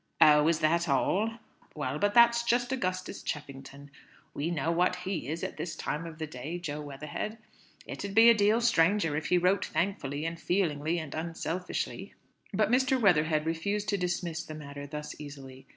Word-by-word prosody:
"Oh, 150 0 +7
is 165 -1 +2
that 170 +2 +2
all? 210 +10 +1 0.4
Well, 145 -1 -3
but 205 0 +1
that's 235 0 +6
just 240 +1 +1
Augustus 185 -8 -3
Cheffington. 140 -1 -7 0.4
We 150 +4 -2
know 165 -1 -1
what 180 +2 +2
he 180 -7 -4
is 160 +3 -4
at - - -4
this 160 0 -4
time 150 +2 -3
of 160 -2 -9
day, 155 +1 -5
Jo 150 -4 -5
Weatherhead. 150 +9 -5 0.5
It - - -6
'ud 200 -1 -5
be 225 +1 +8
a 235 - +9
deal 215 +2 +3
stranger 185 -6 +3
if 155 - -2
he 180 - +3
wrote 180 +2 +2
thankfully, 155 -4 -2
and 165 0 -4
feelingly, 165 -3 0
and 155 -4 -5
unselfishly." 165 +2 -4 0.4
But - - +1
Mr. 260 +1 +3
Weatherhead 155 -7 +3
refused 200 +6 -1
to 205 - +2
dismiss 175 -2 -2
the 155 - -8
matter 145 -1 -8
thus 150 +1 -6
easily. 135 -3 -10
165 Hz, 175 wpm, -29 LUFS, 150-195 Hz, 0.5 s, a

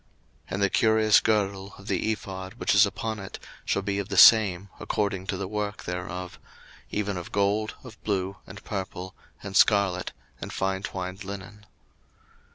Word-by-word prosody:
02:028:008 - - -37 0.5
And 100 - 0
the 100 - +4
curious 110 -1 +5
girdle 100 -2 0
of 95 - -14
the 100 +3 0
ephod, 95 -2 -6
which - - +1
is 100 +1 +7
upon 110 +2 -4
it, 100 -1 -7 0.3
shall 100 - 0
be 100 0 -1
of 100 - -4
the - - -2
same, 100 -4 +7
according 100 -2 -2
to 95 - -2
the 95 0 -3
work 105 +1 -3
thereof; 90 0 -5 0.5
even 100 -2 -2
of 90 - -7
gold, 100 +2 +1
of 115 -5 -13
blue, 95 -2 -1
and 95 0 -11
purple, 95 -2 -5 0.3
and 100 -1 -6
scarlet, 100 -4 +3 0.3
and - - -5
fine 95 0 -1
twined 95 0 -5
linen. 100 +2 -9
100 Hz, 165 wpm, -27 LUFS, 95-105 Hz, 0.5 s, is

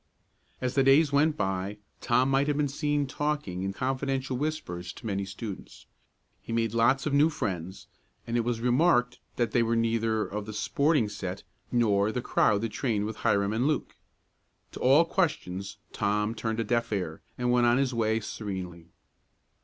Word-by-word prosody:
As 130 0 -1
the 135 - +3
days 140 +3 +5
went 150 +2 +3
by, 95 +1 -2 0.2
Tom 125 +3 +2
might 135 +1 +2
have 145 -1 0
been 150 -1 +2
seen 145 +1 0
talking 145 -10 -2
in 95 0 -2
confidential 130 +3 -2
whispers 125 - -3
to - - -13
many 100 -2 -1
students. 100 +1 -8 0.6
He - - -9
made 115 -1 0
lots 120 +4 +3
of 150 - -1
new 145 +3 +5
friends, 95 - -4 0.4
and 115 - -3
it - - +3
was 115 -1 -1
remarked 125 0 +3 0.2
that 120 -3 0
they 120 - +3
were 115 0 +1
neither 115 -1 +1
of 105 +1 -5
the 110 - -6
"sporting 140 +2 +1
set," 95 -2 -5 0.3
nor 105 -4 +2
the 125 - -2
crowd 105 -3 +2
that 115 - -1
trained 105 -1 -1
with 110 0 -5
Hiram 100 +1 +1
and 120 +5 +1
Luke. 150 -3 -1 0.8
To - - -9
all 140 +6 +5
questions 105 - -2 0.2
Tom 105 +1 0
turned 115 -1 -3
a - - +1
deaf 115 +1 0
ear, 90 -6 -3 0.2
and 125 0 0
went 120 -1 +4
on 120 +1 +4
his 135 -2 +1
way 110 -1 +1
serenely. 95 -6 -6
115 Hz, 175 wpm, -28 LUFS, 105-135 Hz, 0.8 s, days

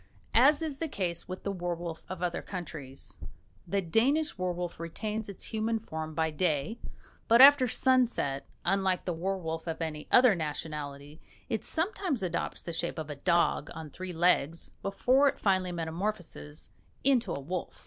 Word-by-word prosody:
As 285 +7 +5
is 295 -4 -4
the 325 - -1
case 180 - -3
with 185 +1 -6
the 200 - -1
werwolf 175 -3 -4
of 185 -1 -5
other 175 -1 -1
countries, 155 -8 -6 0.5
the 195 +2 0
Danish 270 - +2
werwolf 180 -2 -3
retains 210 +6 -4
its 200 - -7
human 225 +1 0
form 160 -7 -6
by 160 0 +1
day; 155 +6 0 0.5
but 230 +1 +6
after 275 -1 +9
sunset, 245 - +2 0.2
unlike 190 0 +1
the 180 - -1
werwolf 165 -2 -3
of 165 - -3
any 155 -2 -4
other 250 -3 +7
nationality, 150 -2 -5 0.3
it 225 -4 -1
sometimes 330 - -1
adopts 180 - -2
the 170 - -5
shape 170 +1 -2
of 155 -1 -4
a - - -5
dog 170 0 +2
on 160 -2 -7
three 185 +3 -6
legs 165 -2 +1
before 255 +8 +3
it - - +1
finally 185 -3 +1
metamorphoses 170 -2 -4 0.3
into 255 -3 +3
a - - -2
wolf. 170 +6 -5
180 Hz, 160 wpm, -30 LUFS, 160-220 Hz, 0.5 s, after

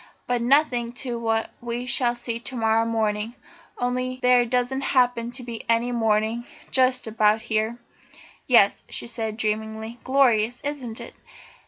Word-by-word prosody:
But 245 -1 0
nothing 245 -2 +2
to 240 -2 -3
what 225 -1 0
we 240 +1 -4
shall 245 -1 +1
see 235 -1 -3
to 255 +2 -5
morrow 225 -1 +2
morning 220 0 -1 0.4
only 255 +1 -1
there 250 -1 +4
doesn't 250 +2 0 0.2
happen 245 -2 +3
to 250 +1 -7
be 235 -2 -6
any 230 +1 +2
morning 225 0 0 0.2
just 255 -1 +2
about 220 0 +2
here." 220 +1 -1 0.7
"Yes," 230 -6 +5
she - - -4
said 225 -2 -4
dreamily, 220 +1 -3
"glorious, 245 -3 +3
isn't 270 -6 -4
it? - - -9
235 Hz, 145 wpm, -24 LUFS, 225-250 Hz, 0.7 s, Yes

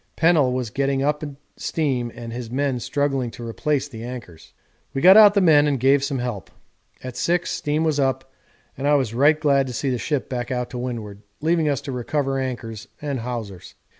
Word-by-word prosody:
Pennell 160 -6 +3
was 125 -3 -2
getting 135 +1 0
up 150 +1 0 0.3
steam 130 -7 -1
and 115 -1 -7
his 120 -1 -6
men 135 0 -1
struggling 135 -2 -1
to 115 0 -8
replace 145 +4 -1
the 115 -5 -9
anchors. 115 -10 -9 0.4
We - - 0
got 185 +3 +8
out 210 -1 +8
the 200 - +4
men 150 -4 +5
and 140 -3 0
gave 135 +2 +4
some 140 -1 -1
help. 120 -7 -4 0.5
At 130 -1 -7
6 175 +7 0
steam 150 +2 -1
was 155 -2 +1
up, 135 -1 -1 0.4
and 140 - -3
I 145 - +5
was 130 -6 0
right 145 +5 +4
glad 140 -3 +2
to 125 - -5
see 135 +3 -1
the 125 - -1
ship 145 +1 -2
back 120 -2 -4
out 125 -1 -3
to 125 - -5
windward, 110 -5 -5 0.2
leaving 160 0 +1
us 140 -1 -1
to 140 -1 -6
recover 135 +2 -1
anchors 115 -4 -5
and 140 -3 -3
hawsers. 115 -6 -6
135 Hz, 200 wpm, -22 LUFS, 120-145 Hz, 0.5 s, got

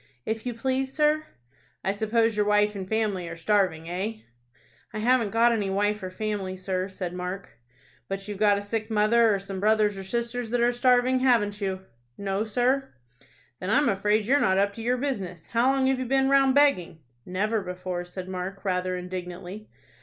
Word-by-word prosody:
"If 220 +2 -3
you 240 - -3
please, 265 +2 -1
sir." 305 +1 +1 0.6
"I 195 - +1
suppose 220 +2 +1
your 210 0 +1
wife 210 0 +3
and 190 -2 -6
family 205 -6 -1
are 165 - -7
starving, 175 -3 +1
eh?" 205 +6 -4 0.7
"I - - -4
haven't 235 0 +2
got 230 +3 +4
any 210 -4 0
wife 205 +2 0
or 185 - -4
family, 195 -1 -3
sir," 185 0 -2
said 185 -2 -5
Mark. 180 +2 -5 0.6
"But 195 +1 -5
you've 205 -2 -6
got 205 -1 +4
a 200 - -4
sick 220 +2 -3
mother, 220 +1 +4
or 200 - +2
some 195 0 -6
brothers 210 -1 +2
or - - -6
sisters 235 +3 -3
that 240 +1 0
are 240 +1 +3
starving, 250 +1 +3
haven't 225 -5 +2
you?" 190 -1 -2 0.4
"No, 195 +1 -1
sir." 250 +5 0 0.7
"Then 185 - -4
I'm 280 +6 +3
afraid 210 +2 +1
you're 275 +6 +3
not 190 0 +3
up 200 +1 +2
to 225 - -8
your 245 +2 +1
business. 195 - -4
How 240 +3 +4
long 270 -1 +1
have 265 -1 +2
you 255 - -2
been 270 +1 +2
round 275 -1 +4
begging?" 230 - +3 0.2
"Never 210 +4 -1
before," 180 -1 -4
said 180 +1 -8
Mark, 190 +2 -6
rather 185 -1 0
indignantly. 180 +3 -7
210 Hz, 190 wpm, -26 LUFS, 190-235 Hz, 0.7 s, got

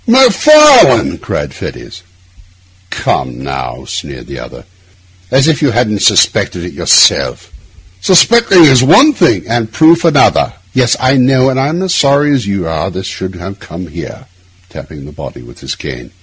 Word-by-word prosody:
'Macfarlane!' 265 - +4
cried - - -6
Fettes. 90 - -10 0.9
'Come 65 0 -4
now!' 70 0 -7
sneered 70 -4 -8
the - - -9
other. - - -12 0.7
'As 135 +3 +1
if 160 -2 0
you 145 - +1
hadn't 110 -4 -2
suspected 90 - +1
it 90 - -9
yourself!' - - +1 0.5
'Suspecting 195 - +4
is 130 -4 +4
one 260 - +4
thing—' 175 -10 0
'And 115 -1 -3
proof 165 +5 +3
another. 160 -4 +2 0.2
Yes, 125 -2 +1
I 130 +2 +1
know; 130 +1 +2
and 130 - -3
I'm 155 +7 -2
as 185 -2 -2
sorry 145 +1 +1
as 125 -7 -2
you 100 -4 -3
are 80 +3 -4
this 95 0 -8
should 95 0 -7
have 95 +3 -10
come 85 +3 -10
here,' 85 +2 -10 0.4
tapping 75 -3 -12
the 75 - -12
body 70 - -11
with - - -16
his - - -7
cane. 60 -4 -10
125 Hz, 160 wpm, -11 LUFS, -, 0.9 s, Macfarlane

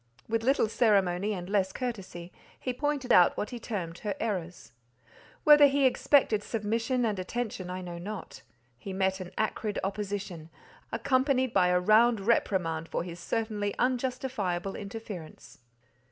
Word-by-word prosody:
With 225 0 0
little 260 -1 +2
ceremony, 200 -3 +2
and 180 -2 -5
less 195 -1 +1
courtesy, 190 -8 -5 0.3
he 255 - -3
pointed 290 0 0
out 180 - +6
what 210 - -3
he 245 - -6
termed 180 -8 -5
her 205 -2 -3
errors. 180 - -4 0.7
Whether 295 -1 +8
he 280 0 +2
expected 255 -4 +3
submission 230 +4 -1
and 210 -4 -1
attention, 200 -2 -4
I 185 +1 -4
know 175 -1 -7
not; 195 - -7 0.4
he 195 - -6
met 190 0 0
an 185 -1 -6
acrid 215 -1 -1
opposition, 195 -4 -4 0.4
accompanied 260 -2 +1
by 185 -2 +4
a 180 0 +3
round 220 +4 +4
reprimand 180 -6 0
for - - -2
his 175 -1 -8
certainly 210 -1 -2
unjustifiable 245 -7 -1
interference. 200 -5 -8
205 Hz, 140 wpm, -29 LUFS, 185-240 Hz, 0.7 s, Whether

